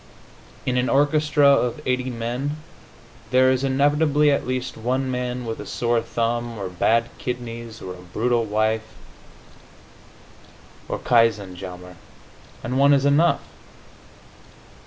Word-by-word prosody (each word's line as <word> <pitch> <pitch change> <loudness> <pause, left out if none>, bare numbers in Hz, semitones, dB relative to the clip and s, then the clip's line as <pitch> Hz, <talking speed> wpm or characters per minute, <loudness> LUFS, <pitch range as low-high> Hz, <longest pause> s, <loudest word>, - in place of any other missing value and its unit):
In 125 0 0
an 125 0 +1
orchestra 150 +1 +3
of 130 -4 +3
eighty 125 0 0
men 125 +5 -3 0.7
there 130 0 +4
is 130 0 0
inevitably 145 +2 +3
at 140 - 0
least 130 0 -3
one 130 +3 -1
man 125 0 -3
with 115 -1 -4
a - - -7
sore 120 -1 0
thumb, 115 0 -2
or 95 -2 -4
bad 115 +6 +1
kidneys, 115 -2 -6
or 90 - -6
a - - -12
brutal 115 +6 0
wife, 110 +1 -1 1.9
or - - -2
katzenjammer 95 -6 0 0.7
and 125 +3 -1
one 140 +1 +6
is 140 0 +1
enough. 150 +5 +3
125 Hz, 120 wpm, -23 LUFS, 115-135 Hz, 1.9 s, one